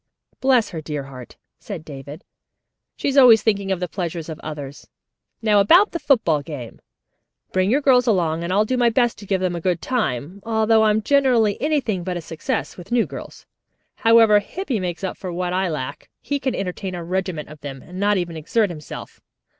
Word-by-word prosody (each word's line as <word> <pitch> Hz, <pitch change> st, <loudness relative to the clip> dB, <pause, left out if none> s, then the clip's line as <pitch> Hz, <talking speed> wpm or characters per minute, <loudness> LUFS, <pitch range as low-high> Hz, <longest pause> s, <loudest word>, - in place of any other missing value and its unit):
"Bless 255 Hz, -5 st, +3 dB
her 165 Hz, -4 st, -5 dB
dear 150 Hz, -2 st, -4 dB
heart," 130 Hz, -3 st, -11 dB, 0.2 s
said 180 Hz, -7 st, -7 dB
David, 145 Hz, +3 st, -9 dB, 0.7 s
"she -, -, -3 dB
is 280 Hz, 0 st, 0 dB
always 235 Hz, -4 st, +7 dB
thinking 200 Hz, -3 st, +1 dB
of 190 Hz, -, 0 dB
the 180 Hz, -, -2 dB
pleasure 175 Hz, -1 st, -4 dB
of 160 Hz, -1 st, -6 dB
others. 145 Hz, -2 st, -8 dB, 0.6 s
Now 210 Hz, -2 st, +4 dB
about 345 Hz, -, +5 dB
the 335 Hz, -, -3 dB
football 220 Hz, -, +2 dB
game. 140 Hz, -6 st, -8 dB, 0.7 s
Bring 185 Hz, +1 st, +1 dB
your 270 Hz, +6 st, +2 dB
girls 255 Hz, -3 st, +4 dB
along 170 Hz, -6 st, +1 dB
and 170 Hz, -, -3 dB
I'll 205 Hz, +3 st, +3 dB
do 255 Hz, +3 st, -1 dB
my 240 Hz, -1 st, +4 dB
best 240 Hz, 0 st, +1 dB
to 205 Hz, -, -11 dB
give 190 Hz, -1 st, 0 dB
them 180 Hz, -1 st, 0 dB
a 170 Hz, -, -4 dB
good 180 Hz, -1 st, 0 dB
time, 170 Hz, -, -2 dB
although 220 Hz, 0 st, +3 dB
I'm 215 Hz, 0 st, +2 dB
generally 245 Hz, -6 st, +3 dB
anything 255 Hz, -, 0 dB
but 180 Hz, 0 st, -3 dB
a -, -, -5 dB
success 160 Hz, -1 st, -4 dB
with 175 Hz, +4 st, -11 dB
new 240 Hz, -1 st, +3 dB
girls. -, -, -10 dB, 0.5 s
However, 225 Hz, -2 st, +6 dB
Hippy 265 Hz, -, -4 dB
makes 180 Hz, 0 st, -4 dB
up 190 Hz, -, -3 dB
for 185 Hz, -, -6 dB
what 180 Hz, +1 st, -2 dB
I 185 Hz, 0 st, 0 dB
lack. 150 Hz, -5 st, -5 dB
He 285 Hz, 0 st, -2 dB
can 265 Hz, -2 st, -1 dB
entertain 185 Hz, 0 st, -4 dB
a 175 Hz, -, -5 dB
regiment 180 Hz, -3 st, -3 dB
of 155 Hz, -1 st, -12 dB
them, 135 Hz, -2 st, -7 dB
and 180 Hz, +2 st, -9 dB
not 205 Hz, 0 st, +2 dB
even 175 Hz, -2 st, -3 dB
exert 195 Hz, +6 st, 0 dB
himself. 155 Hz, -4 st, -9 dB
190 Hz, 200 wpm, -22 LUFS, 165-225 Hz, 0.7 s, always